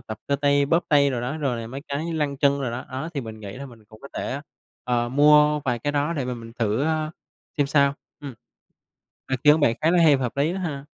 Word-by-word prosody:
tập 110 - -8
cơ 140 - +1
tay 140 0 +2
bóp 165 +4 +2
tay 140 -3 +4
đồ 125 - -2
đó, 125 +6 -3
rồi 130 -6 -2
là 115 - -6
mấy 130 +4 -7
cái 145 +3 -3
như 170 - -3
lăn 145 -3 -1
chân 140 0 +2
đồ 125 - -2
đó, 120 +2 -5
ó 135 +5 -5
thì 140 - -1
mình 110 -3 -9
nghĩ 100 -2 -7
là 140 +1 -7
mình 115 -4 -16
cũng 110 0 -17
có 140 - -10
thể, 135 - -3 0.4
ờ, 120 -1 0
mua 150 +2 +5
vài 125 -2 0
cái 145 +5 -2
đó 145 +3 0
để 140 -6 -2
mà 125 0 -3
mình 115 -1 -10
thử, 110 +2 0
a, 155 -1 -1 0.5
xem 145 - +3
sao, 140 -1 +3 0.3
ừm. 140 -4 -8 1.0
Ý 130 - +1
kiến 150 +1 +6
bạn 115 -5 +3
khá 160 - +4
là 175 -1 +4
hay 150 -3 +6
và 135 - -4
hợp 125 +2 -3
lý 150 +4 +1
đó 190 - -4
ha. 145 -6 -4
140 Hz, 270 wpm, -24 LUFS, 125-150 Hz, 1.0 s, kiến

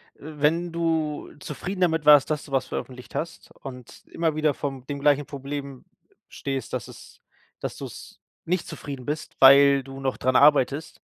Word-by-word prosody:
wenn 155 +3 -1
du 160 -3 -1
zufrieden 180 +7 -6
damit 160 -4 +2
warst, 150 -2 +7
dass 150 -1 -2
du 140 - -14
was 135 - +1
veröffentlicht 125 -1 -7
hast 165 +1 -5
und 125 -3 -11
immer 165 -2 -1
wieder 155 -1 +2
von 135 -2 -5
dem 140 -1 -4
gleichen 145 0 +3
Problem 140 -1 -7 0.5
stehst, 135 -1 -4
dass - - -3
es - - -14 0.4
dass - - -5
du's - - -10 0.3
nicht 180 +1 -1
zufrieden 135 -3 -7
bist, 150 +3 -4
weil 140 0 +7
du 135 0 -10
noch 135 -1 -2
dran 130 0 0
arbeitest 145 +1 +3
145 Hz, 160 wpm, -25 LUFS, 135-155 Hz, 0.5 s, warst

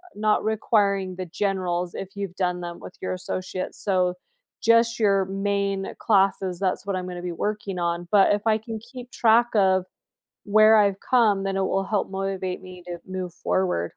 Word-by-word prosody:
not 210 0 +1
requiring 200 -4 +1
the 185 - -4
generals 180 -2 -1
if 195 +1 -7
you've 195 -3 -5
done 180 -1 -1
them 175 0 -6
with - - -11
your 185 - -2
associate's, 185 0 -5
so 185 -3 +1 0.5
just 230 +1 +3
your 195 -3 +3
main 195 0 -2
classes, 195 -3 +2
that's 190 0 -1
what 200 -2 -2
I'm 185 0 -4
gonna 175 -1 -6
be 180 -1 -4
working 205 +1 -3
on, 170 0 -2
but 205 0 +5
if 205 +2 -2
I 215 0 +4
can 220 0 -7
keep 245 +2 -11
track 235 +1 +4
of 190 -2 +3 0.6
where 215 +1 +6
I've 200 -2 +3
come, 220 -6 +3
then 195 0 -1
it 195 - +1
will 195 0 0
help 205 -1 -1
motivate 190 -1 -3
me 185 -1 -11
to 175 -1 -6
move 185 -2 -5
forward. 180 - 0
195 Hz, 180 wpm, -24 LUFS, 185-210 Hz, 0.6 s, where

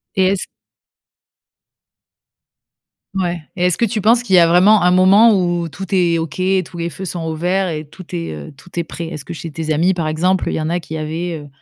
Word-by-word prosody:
Et 190 -2 +3
est-ce 195 - -3 2.7
Ouais 175 -3 -1
et 180 -1 0
est-ce 180 -2 +1
que 235 - +2
tu 215 0 -2
penses 230 +4 +4
qu'il 190 -6 +1
y - - +8
a 170 - +6
vraiment 185 +3 +5
un 180 - +4
moment 195 +5 +6
où 175 -2 0
tout 175 +5 -8
est 170 -2 +2
OK 160 +1 -5
et 185 0 +2
tous 175 +1 -12
les 170 0 -3
feux 190 +6 -7
sont 175 -2 -5
au 160 0 -3
vert 185 +4 0
et 155 -2 -4
tout 185 +4 -12
est, 85 -1 -4
heu, 75 -1 -9
tout 180 - -17
est 170 - 0
prêt? 165 +1 -7
Est-ce 150 -4 -7
que 170 - -6
chez 165 0 -7
tes 155 0 -2
amis, 175 +5 +2
par 165 -3 -2
exemple, 180 +4 +1
il - - -1
y 160 - -2
en 155 - -2
a 175 +1 0
qui 160 0 -8
avaient, 160 +2 -4
heu, 145 - -11
175 Hz, 240 wpm, -18 LUFS, 160-185 Hz, 2.7 s, y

